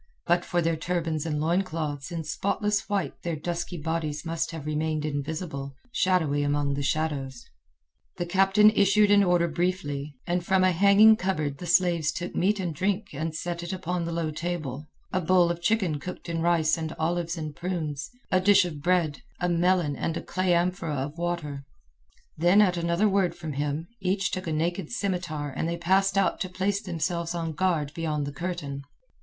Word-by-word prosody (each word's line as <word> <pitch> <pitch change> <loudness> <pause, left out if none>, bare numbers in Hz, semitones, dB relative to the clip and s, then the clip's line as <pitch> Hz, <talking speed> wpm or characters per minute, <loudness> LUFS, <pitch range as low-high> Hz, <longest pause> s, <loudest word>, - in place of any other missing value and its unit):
But 175 +1 +2
for 175 -1 0
their 165 0 +1
turbans 165 -1 -2
and 150 -2 -1
loincloths 160 -3 -1
in 165 -1 -3
spotless 205 +6 -1
white 200 -3 -2
their 170 -2 -2
dusky 170 +3 -4
bodies 155 -1 -3
must 165 0 -1
have 160 -3 -7
remained 155 0 -1
invisible, 145 -1 -4 0.2
shadowy 160 -9 +2
among 145 0 +1
the 140 - -2
shadows. 140 -4 -2 0.7
The 175 - -2
captain 195 +4 +5
issued 205 0 +4
an 200 0 +6
order 175 -2 +3
briefly, 155 -4 -2
and 175 0 0
from 190 +1 +3
a 185 - +5
hanging 200 +4 +6
cupboard 155 -8 -2
the 175 - -6
slaves 170 -3 +3
took 175 +2 -5
meat 205 +3 +2
and 175 -4 -2
drink 195 +4 -1
and 155 +2 -3
set 170 +1 -3
it 175 - -5
upon 180 -2 -2
the 170 - -3
low 165 -2 -1
table—a 155 +1 -4
bowl 175 0 +4
of 170 0 -5
chicken 185 -6 +1
cooked 180 +5 -7
in 165 -1 -2
rice 165 -1 +2
and 160 0 -4
olives 170 +1 -1
and 155 -2 -5
prunes, 160 -6 -3 0.2
a 185 - +4
dish 200 -1 +5
of 155 -5 -6
bread, 170 -3 +1 0.2
a 180 - 0
melon, 175 -3 +2
and 165 +4 -2
a - - -5
clay 185 -1 +1
amphora 175 -2 0
of 145 +4 -4
water. 170 -5 -3 0.7
Then 175 +5 +4
at 190 -4 +4
another 170 +4 +1
word 195 -3 +1
from 160 -3 -6
him, 145 +3 -2
each 195 +1 0
took 185 -1 -4
a - - -1
naked 170 +2 -1
scimitar 175 -9 -2
and 160 - -1
they 170 - -2
passed 190 +3 +2
out 195 - +2
to 185 - -2
place 195 +2 -1
themselves 170 -1 -2
on 165 -1 -2
guard 155 -4 0
beyond 155 -3 -2
the 140 - -5
curtain. 170 -5 -4
170 Hz, 185 wpm, -27 LUFS, 155-185 Hz, 0.7 s, an